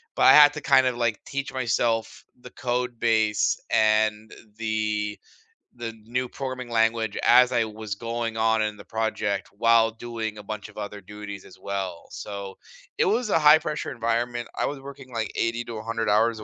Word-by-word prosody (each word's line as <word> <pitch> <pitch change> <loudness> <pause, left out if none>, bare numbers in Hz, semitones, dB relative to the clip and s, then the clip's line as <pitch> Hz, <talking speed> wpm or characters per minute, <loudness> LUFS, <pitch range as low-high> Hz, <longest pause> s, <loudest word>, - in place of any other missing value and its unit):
but - - +1
I - - +9
had 145 -1 +8
to 150 - -6
kinda, 130 -2 +4
like, 115 -3 0
teach 140 0 -4
myself 120 -2 -1 0.2
the 125 0 -12
code 125 -1 -2
base 110 -3 +2
and 110 0 +2 0.3
the 110 -2 -2 0.6
the 120 -2 -5
new 125 +2 -2
programming 130 -1 -6
language 115 -2 +1
as 125 +1 +6
I 120 - +3
was 110 -2 -6
going 115 +1 -3
on 110 0 +2
in 105 -1 -1
the 100 - -12
project 105 -3 -2
while 115 +1 +4
doing 110 -1 -5
a 105 - -9
bunch 110 0 -6
of 105 - -17
other 105 -1 -6
duties 100 0 -9
as 90 - -15
well. 95 -4 -5
So 100 -1 -7 0.4
it - - +3
was 220 +4 +1
a 165 - +3
high-pressure 150 0 +4
environment, 120 +1 -2
I - - +1
was 140 -2 -4
working, 135 -2 -11
like, 110 -2 -2
80 115 +1 -1
to 115 - -6
100 115 0 -2
hours 110 +2 +3
a - - -8
115 Hz, 180 wpm, -25 LUFS, 105-120 Hz, 0.6 s, I